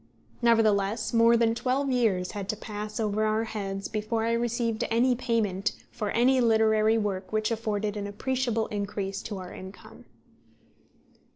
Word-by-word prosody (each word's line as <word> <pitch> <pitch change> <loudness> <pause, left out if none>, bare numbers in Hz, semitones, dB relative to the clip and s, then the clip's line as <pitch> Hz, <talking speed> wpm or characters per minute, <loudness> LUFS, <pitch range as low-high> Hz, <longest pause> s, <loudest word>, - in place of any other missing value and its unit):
Nevertheless, 220 -2 +2
more 230 0 +5
than 225 -1 +3
twelve 265 +3 0
years 210 -8 +1
had 200 -1 -6
to 215 - 0
pass 210 0 -6
over 215 -1 0
our 215 +1 +1
heads 195 -3 -4
before 220 +1 -2
I 230 - +1
received 235 -1 0
any 240 +3 +3
payment 225 -6 0 0.2
for 210 - -3
any 255 +4 +3
literary 220 -1 +3
work 200 -3 -2
which 215 +1 0
afforded 215 -2 -2
an 205 -1 -4
appreciable 235 +1 -1
increase 200 -1 -3
to 205 - -6
our 185 -1 -8
income. 190 +1 -11
220 Hz, 150 wpm, -27 LUFS, 205-230 Hz, 0.2 s, more